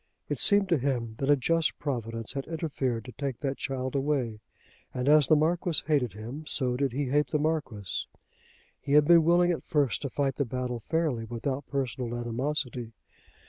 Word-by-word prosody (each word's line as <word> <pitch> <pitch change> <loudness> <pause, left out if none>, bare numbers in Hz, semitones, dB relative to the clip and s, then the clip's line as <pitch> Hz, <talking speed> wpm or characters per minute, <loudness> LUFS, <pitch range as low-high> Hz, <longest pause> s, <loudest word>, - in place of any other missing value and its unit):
It - - -2
seemed 200 -1 +4
to 170 -5 +3
him 120 -4 -1
that 135 - -1
a 145 - +7
just 165 +5 +1
Providence 115 -5 -3
had 135 -1 -4
interfered 140 -8 -2
to 125 - -8
take 135 -2 -4
that 135 -1 -2
child 130 -1 -3
away. 135 -6 0 0.6
And 125 +1 -2
as 150 -2 +6
the 155 - +6
Marquis 165 +2 +1
hated 140 - +1
him, 115 +9 -7
so 125 -3 0
did 135 0 0
he 140 +4 -1
hate 145 +1 +2
the 150 - 0
Marquis. 145 - -2 0.7
He 140 - -3
had 150 0 +7
been 170 +1 +7
willing 175 +2 +4
at 170 - -2
first 145 -7 +1
to 140 - -3
fight 135 -1 -1
the 140 - +2
battle 125 0 -3
fairly 150 -4 -1
without 130 +4 -3
personal 125 -3 -2
animosity. 120 0 -2
135 Hz, 180 wpm, -28 LUFS, 120-150 Hz, 0.7 s, a